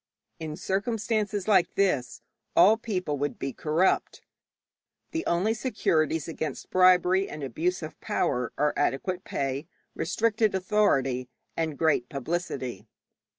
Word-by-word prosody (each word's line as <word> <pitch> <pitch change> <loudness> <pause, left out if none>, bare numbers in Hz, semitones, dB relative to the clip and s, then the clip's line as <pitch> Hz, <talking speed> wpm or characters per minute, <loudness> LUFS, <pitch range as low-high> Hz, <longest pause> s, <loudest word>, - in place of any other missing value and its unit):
In 155 -2 -5
circumstances 210 +1 -1
like 190 -5 +3
this 130 -13 0 0.3
all 190 +6 +7
people 185 - -3
would 145 +1 -2
be 135 -1 -4
corrupt. 160 +8 0 0.9
The 330 0 -2
only 185 +6 +2
securities 165 - 0
against 155 -3 -5
bribery 185 +1 +4
and 150 -1 -7
abuse 165 +7 -1
of 155 - -8
power 125 -2 -1
are 150 0 +2
adequate 175 +6 -1
pay, 135 +2 -3 0.3
restricted 220 +3 +1
authority, 135 -11 +1 0.3
and 160 -3 -2
great 155 -7 +2
publicity. 140 - -4
170 Hz, 115 wpm, -27 LUFS, 145-195 Hz, 0.9 s, all